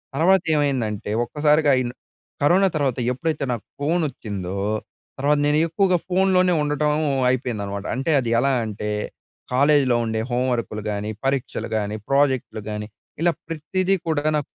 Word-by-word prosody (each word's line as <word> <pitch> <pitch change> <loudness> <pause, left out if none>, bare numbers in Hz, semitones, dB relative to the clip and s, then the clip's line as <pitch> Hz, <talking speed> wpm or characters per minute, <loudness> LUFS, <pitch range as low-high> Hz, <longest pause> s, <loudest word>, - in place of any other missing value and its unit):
తర్వాత 185 +4 +4
ఏమైందంటే 125 -9 -1
ఒక్కసారిగా 150 +2 +2
ఈల్ 120 0 -3 0.5
కరోనా 180 +7 +4
తర్వాత 135 -5 0
ఎప్పుడైతే 155 +3 -2
నాకు 115 -5 -4
ఫోనోచ్చిందో 125 - -2 0.6
తర్వాత 145 +2 +3
నేను 150 +1 +3
ఎక్కువగా 185 +2 +2
ఫోన్‌లోనే 185 -1 +3
ఉండటం 150 0 +1 0.4
అయిపోయిందనమాట. 105 -6 -2
అంటే 135 +5 -1
అది 120 -3 -2
ఎలా 135 +3 +2
అంటే 105 0 -4 0.6
కాలేజ్‌లో 140 -2 +4
ఉండే 110 -1 -1
హోమ్ 125 +1 +1
వర్క్‌లు 110 -2 -3
గాని, 105 +1 -3 0.2
పరీక్షలు 135 -2 -1
గాని, 105 0 -2
ప్రాజెక్ట్‌లు 135 -5 +1
గాని 105 0 -4 0.3
ఇలా 175 0 +4 0.2
ప్రతీదీ 185 +4 0
కూడా 155 -3 0
నా 150 - +2
140 Hz, 130 wpm, -22 LUFS, 115-155 Hz, 0.6 s, తర్వాత